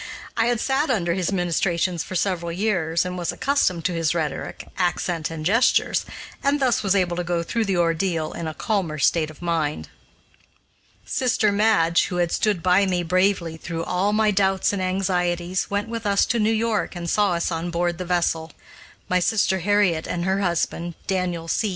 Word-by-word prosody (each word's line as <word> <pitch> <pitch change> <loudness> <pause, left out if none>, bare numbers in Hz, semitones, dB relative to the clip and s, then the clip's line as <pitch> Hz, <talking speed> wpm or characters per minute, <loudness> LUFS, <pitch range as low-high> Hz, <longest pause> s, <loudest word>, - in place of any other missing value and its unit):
I 225 0 +2
had 240 -2 +1
sat 275 +5 0
under 175 -9 +1
his 185 0 -1
ministrations 175 -1 0
for 185 - -7
several 170 -2 -1
years, 175 -3 0
and 180 0 -4
was 175 -1 -1
accustomed 185 - 0
to 180 - +1
his 165 -1 0
rhetoric, 155 -4 -4
accent, 175 -2 -1
and 160 -1 -6
gestures, 230 +8 +2 0.4
and 280 +1 +2
thus 255 -4 +2
was 200 -1 +1
able 180 -3 +1
to 180 - -1
go 175 -1 -1
through 230 +5 -1
the 195 -3 0
ordeal 165 -1 0
in 170 - -5
a 155 - -5
calmer 190 -8 -1
state 155 +2 +2
of 155 +2 -13
mind. 155 - -1 1.2
Sister 230 -5 +1
Madge, 200 -5 +3
who 180 - -5
had 175 -1 0
stood 205 -6 0
by 185 +2 +4
me 180 -2 0
bravely 180 -1 +1
through 165 0 -5
all 190 +5 0
my 215 0 +3
doubts 195 0 +1
and 200 - -2
anxieties, 180 -1 -1
went 205 +2 -1
with 230 -1 -4
us 200 -1 +3
to 235 - 0
New 215 0 +2
York 225 -3 0
and 175 -1 -5
saw 205 0 +2
us 170 +1 -1
on 165 +1 -2
board 175 0 -1
the - - -2
vessel. 170 -2 -1 0.5
My 180 - +2
sister 190 0 +1
Harriet 185 -3 +2
and 175 0 -2
her 190 +1 +1
husband, 170 -1 -1
Daniel 180 -3 -2
C. 210 +6 0
180 Hz, 190 wpm, -23 LUFS, 170-200 Hz, 1.2 s, by